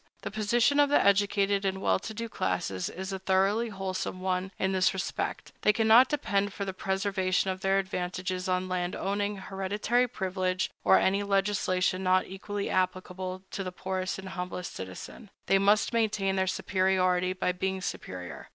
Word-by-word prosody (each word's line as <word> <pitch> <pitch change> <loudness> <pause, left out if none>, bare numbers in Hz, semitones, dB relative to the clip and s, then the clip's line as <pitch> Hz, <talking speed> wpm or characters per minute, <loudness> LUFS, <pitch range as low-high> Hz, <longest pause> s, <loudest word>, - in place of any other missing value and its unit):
The - - -4
position 235 +7 +2
of 290 -1 +5
the 290 - +5
educated 200 0 +3
and 190 -1 -1
well - - +2
to 210 - -7
do 230 +2 -4
classes 95 - -2
is 190 +2 -6
a 190 - -3
thoroughly 195 +5 +2
wholesome 190 -2 -4
one 185 0 -1
in 190 - 0
this 185 0 +2
respect: 185 - -3
they 210 - +5
cannot 225 +3 +6
depend 205 -8 0
for 200 - -4
the 190 - -4
preservation 190 -1 0
of 185 0 -6
their 195 0 +2
advantages 185 -1 -2
on 185 0 0
land 180 0 -2
owning, 205 +1 -1
hereditary 205 +6 0
privilege, 185 -4 -2
or 190 - +6
any 195 +2 +2
legislation 195 -2 +1
not 185 0 +3
equally 200 +2 -5
applicable 185 0 -2
to 195 - -3
the 185 - -4
poorest 185 +1 -3
and 190 0 -7
humblest 180 -1 -5
citizen. 95 - -8 0.2
They 195 - +4
must 205 +4 +3
maintain 210 -4 +1
their 190 0 +1
superiority 185 -1 +1
by 185 0 0
being 190 +1 -2
superior. 90 - -6
190 Hz, 170 wpm, -29 LUFS, 185-205 Hz, 0.2 s, cannot